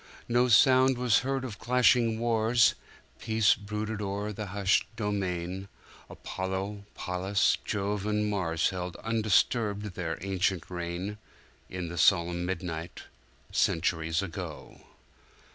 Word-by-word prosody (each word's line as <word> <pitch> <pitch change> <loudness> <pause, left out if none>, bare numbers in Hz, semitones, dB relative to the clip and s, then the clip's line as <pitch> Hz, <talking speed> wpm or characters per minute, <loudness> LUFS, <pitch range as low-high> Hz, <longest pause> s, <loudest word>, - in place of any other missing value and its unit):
No 120 +1 +3
sound 130 +2 +5
was 125 -3 +3
heard 135 0 -2
of 105 -5 -7
clashing 120 -2 +3
wars— 115 0 +3 0.5
Peace 110 -1 +3
brooded 105 +1 -4
o'er 100 +1 -3
the 105 +1 -5
hushed 100 0 +1
domain:Apollo, 95 0 -5
Pallas, 95 +3 +1
Jove 105 0 -2
and 105 0 0
Mars 90 -4 0
Held 90 -1 -5
undisturbed 105 -2 +1
their 80 -2 -3
ancient 95 -2 -1
reign, 90 +4 -4 0.5
In 90 -2 -5
the 85 -1 -5
solemn 85 -1 +3
midnight, 85 -2 -5 0.5
Centuries 80 +1 +1
ago.' 85 -5 -7
100 Hz, 110 wpm, -29 LUFS, 90-110 Hz, 0.5 s, sound